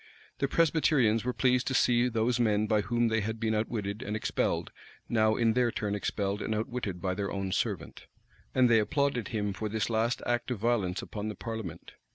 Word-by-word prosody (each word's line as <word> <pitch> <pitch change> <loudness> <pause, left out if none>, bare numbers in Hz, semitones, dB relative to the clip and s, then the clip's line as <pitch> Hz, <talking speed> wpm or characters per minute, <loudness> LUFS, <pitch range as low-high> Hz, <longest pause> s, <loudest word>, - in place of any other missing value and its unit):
The 140 - +1
Presbyterians 145 -8 +3
were 125 - 0
pleased 125 0 +2
to 130 - 0
see 120 0 +3
those 115 +1 +1
men 105 -2 +2
by 105 -1 +2
whom 120 +3 +1
they 110 0 +1
had 110 +2 -3
been 110 -1 0
outwitted 110 -1 -2
and 105 -4 -3
expelled, 110 - -1 0.4
now 110 -1 +3
in 115 -1 +2
their 120 0 +2
turn 105 -2 -2
expelled 100 0 -2
and 110 - -1
outwitted 110 -5 -3
by 95 -1 0
their 100 +1 -3
own 95 -1 -3
servant; - - -3 0.5
and 130 -1 +5
they 115 -1 +5
applauded 125 +1 0
him 105 -3 -2
for 105 +3 -4
this 110 +1 -1
last 115 +2 0
act 120 0 -1
of 125 - -1
violence 105 -4 0
upon 105 0 -5
the 105 - -4
parliament. 110 -7 -6
110 Hz, 200 wpm, -29 LUFS, 105-120 Hz, 0.5 s, and